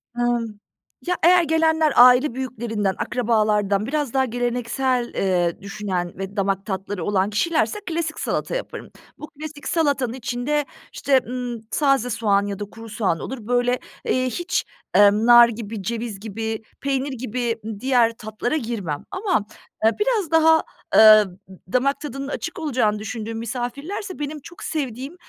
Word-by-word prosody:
Imm, 240 -3 -1 0.5
ya 360 - +2
eğer 355 +1 +6
gelenler 320 -1 +2
aile 250 +2 +7
büyüklerinden, 225 -6 -2
akrabalardan 210 -4 +1
biraz 290 -1 -2
daha 265 -1 +3
geleneksel, 245 +1 -1
eee, 175 -3 0
düşünen 195 -3 -4
ve 195 +1 -6
damak 195 -1 -1
tatları 195 -2 -4
olan 200 -1 +1
kişilerse 325 - 0
klasik 325 -1 -2
salata - - -2
yaparım. - - -6 0.3
Bu 300 - -8
klasik 305 -1 -9
salatanın 280 -7 +1
içinde, 255 +4 -2 0.3
işte, 270 -2 +3
ımm, 245 -2 -4
taze 275 -4 +2
soğan 205 -3 +1
ya 200 -1 -5
da 205 - -3
kuru 225 +2 -12
soğan 205 -6 -1
olur. 265 - -5
Böyle, 245 0 +1 0.3
eee, 255 0 +1
hiç, 345 +8 -1 0.3
emm, 205 +2 +5
nar 240 0 +8
gibi, 220 -2 -6
ceviz 230 -1 -4
gibi, 220 +1 -4 0.2
peynir 275 0 -1
gibi, 240 -1 -2
ııı, 220 -2 -5
diğer 245 -2 +3
tatlara 215 +6 -3
girmem 215 - -4
ama, 375 - 0 0.4
eee, 220 - +6
biraz 420 -6 0
daha, 320 0 +5 0.3
eee, 215 -1 +9 0.2
d 185 0 -16
damak 275 +3 +1
tadının 275 -2 -5
açık 335 +4 -5
olacağını 245 -9 0
düşündüğüm 220 +1 -5
misafirlerse 280 - -5
benim 295 +1 -4
çok 325 +4 -12
sevdiğim 275 0 -4
240 Hz, 145 wpm, -22 LUFS, 215-285 Hz, 0.5 s, eee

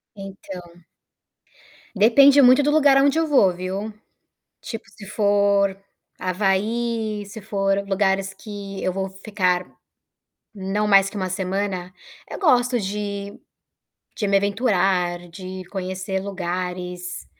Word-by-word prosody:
Então 190 -3 -10 1.1
depende 275 +7 +6
muito 255 +2 +6
do 295 - +2
lugar 285 -3 +5
aonde 280 +3 +3
eu 325 - +1
vou, 205 -11 +4
viu? 190 +4 -5 0.7
Tipo, 225 - -7
se 215 - -13
for 200 -2 +2 0.4
Havaí, 210 +3 -1
se 205 +1 -10
for 195 -1 0
lugares 195 -1 0
que 200 -1 -8
eu 185 - -1
vou 190 0 -3
ficar, 185 -4 0 0.9
não 200 +1 -2
mais 195 -1 +5
que 210 - -14
1 185 -1 -2
semana, 185 -1 -3 0.4
eu - - -6
gosto 250 -8 +3
de 200 0 -5 0.8
de 210 - -2
me 200 - +2
aventurar, 190 -4 +1
de 185 +2 -8
conhecer 190 0 -3
lugares, 180 -2 -5
195 Hz, 115 wpm, -22 LUFS, 185-215 Hz, 1.1 s, depende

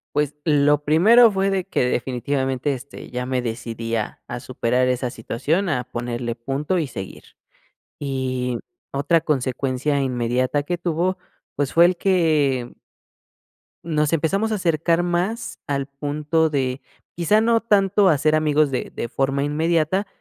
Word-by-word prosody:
Pues, 150 0 +1
lo 145 -1 +3
primero 220 +10 +6
fue 195 0 0
de 190 -2 0
que 175 - 0
definitivamente, 130 +2 -1
este, 135 +2 -9
ya 125 0 -3
me 130 -1 -1
decidí 115 0 -4
a 110 - -4
a 120 0 -6
superar 125 0 0
esa 125 -1 -1
situación, 150 - -1
a 125 -6 -1
ponerle 120 0 -4
punto 140 +9 -2
y 155 - 0
seguir. 95 -7 -8 0.7
Y 130 -3 -2 0.3
otra 145 +4 +2
consecuencia 135 0 -1
inmediata 125 +2 0
que 175 +3 -3
tuvo, 175 +2 -1 0.4
pues 140 -1 -1
fue 170 +1 +6
el 180 +1 +3
que 155 -10 +1 1.1
nos 155 -2 0
empezamos 195 +8 +1
a 215 - 0
acercar 170 -1 +1
más 180 +7 -2
al 140 -1 -1
punto 150 +3 -1
de, 130 -2 -1 0.3
quizá 175 +6 +3
no 230 0 +3
tanto 200 -2 +3
a 155 -5 +3
ser 155 +2 +2
amigos 155 -1 +2
de 125 - -2
de 120 - -4
forma 135 +3 0
inmediata, 165 +5 +1
145 Hz, 145 wpm, -22 LUFS, 130-170 Hz, 1.1 s, primero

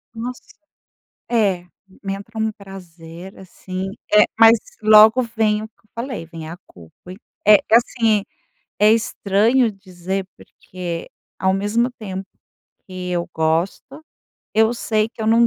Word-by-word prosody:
Nossa. 245 +2 -6 0.9
É, 200 -7 +1 0.4
me 195 -1 -3
entra 215 +3 -9
um 220 0 0
prazer 180 -3 -12
assim, 185 0 -7 0.3
eh, 210 - +8 0.2
mas 225 0 +8 0.2
logo 215 +3 +7
vem 220 -2 0
o 220 - -7
que 220 - -51
eu - - -31
falei, 235 -5 -5
vem 165 -1 -9
a 165 - -7
culpa. 85 - -15 0.3
É 210 0 +9
é 220 - -1
assim, 230 -3 +2 0.6
é 210 +1 +6
estranho 225 +2 +2
dizer 190 -1 -5
porque 175 -2 -8 0.3
ao 190 0 +1
mesmo 210 +5 0
tempo 195 -5 -7 0.6
que 185 -1 -6
eu 175 -1 -1
gosto, 170 - -2 0.5
eu 220 +1 +4
sei 215 -2 0
que 235 - -14
eu - - -2
não 230 +1 +5
205 Hz, 140 wpm, -20 LUFS, 185-225 Hz, 0.9 s, É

